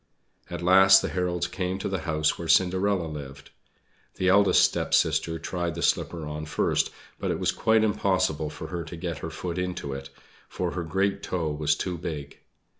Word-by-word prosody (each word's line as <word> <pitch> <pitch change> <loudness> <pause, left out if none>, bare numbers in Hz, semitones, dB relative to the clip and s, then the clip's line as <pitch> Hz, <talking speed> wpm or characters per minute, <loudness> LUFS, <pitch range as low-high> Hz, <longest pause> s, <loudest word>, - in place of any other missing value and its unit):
At - - -5
last 95 +1 +7
the - - -1
heralds 90 -1 -1
came 90 +1 -3
to 95 - -4
the 95 -1 -2
house 75 0 +1
where 85 - -6
Cinderella 95 +1 +3
lived. 70 -3 -8 0.6
The 95 - +1
eldest 100 +1 +5
stepsister 80 0 +1
tried 85 0 -3
the - - -4
slipper 85 -3 0
on 75 +1 -5
first, - - +1 0.3
but - - -2
it - - 0
was - - +1
quite 110 0 +2
impossible 95 -7 +1
for - - -8
her 85 -2 -4
to 85 +2 -8
get 85 -3 -4
her 80 - -5
foot 85 +2 -5
into 90 -6 -3
it, 70 0 -7 0.4
for - - -3
her 90 - -3
great 95 +5 0
toe 85 -4 -2
was 75 0 +1
too 90 -3 -4
big. 75 -4 -6
85 Hz, 185 wpm, -26 LUFS, 80-95 Hz, 0.6 s, last